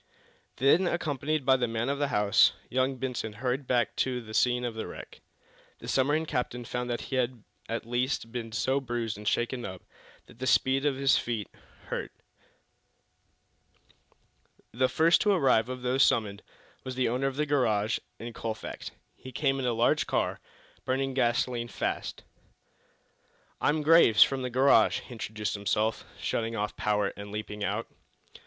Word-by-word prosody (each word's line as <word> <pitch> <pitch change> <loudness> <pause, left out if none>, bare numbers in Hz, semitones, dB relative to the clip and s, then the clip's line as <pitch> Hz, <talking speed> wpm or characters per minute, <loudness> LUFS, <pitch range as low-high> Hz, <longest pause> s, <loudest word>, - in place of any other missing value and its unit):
Then, 150 +8 +4
accompanied 155 -3 -1
by 130 0 +5
the 125 -1 0
man 115 +1 -2
of 140 +1 -1
the 145 - +1
house, 105 -2 +4 0.2
young 130 +1 +1
Benson 125 -4 -3
hurried 125 +4 -2
back 120 -1 +1
to 130 -1 0
the 110 -2 -10
scene 125 +1 +2
of 120 - -3
the 110 - -5
wreck. - - -10 0.6
The - - -11
submarine 145 +4 +2
captain 125 -4 -3
found 125 +1 -3
that 120 - -2
he 130 - -3
had 125 -3 -1 0.3
at 115 0 -3
least 120 0 -1
been 115 -2 -5
so 130 +5 +1
bruised 120 -3 -3
and 105 0 -8
shaken 120 +2 0
up 95 -3 -7 0.4
that 125 - -12
speed 135 +3 +3
on 140 - +1
his 135 0 +3
feet 115 -4 -3 0.4
hurt. - - -3 2.6
The 130 +2 +2
first 165 +5 +4
to 210 - +3
arrive, 130 - +3
of 130 -1 -6
those 125 +2 +1
summoned, 105 -6 +2 0.4
was 130 -1 -5
the 130 0 +1
owner 125 +4 0
of 135 - -3
the 150 +2 0
garage 115 -7 +1 0.2
in 115 0 -7
Colfax. 110 -1 -5 0.3
He 130 - -11
came 135 +1 0
in 130 - -1
a - - +2
large 115 +1 +2
car, - - 0 0.4
burning 135 +1 -1
gasoline 120 -1 0
fast. - - -4 1.4
"I'm 150 +1 +1
Graves, 155 -9 +7
from 135 -1 -2
the 125 - -2
garage," 130 +3 +4
he - - -15
introduced 110 -3 -4
himself, 105 +2 -1
shutting 115 0 -2
off 105 -1 -2
power 105 -2 0
and 100 0 -9
leaping 105 0 -5
out. 105 +3 -1
125 Hz, 160 wpm, -28 LUFS, 115-135 Hz, 2.6 s, Graves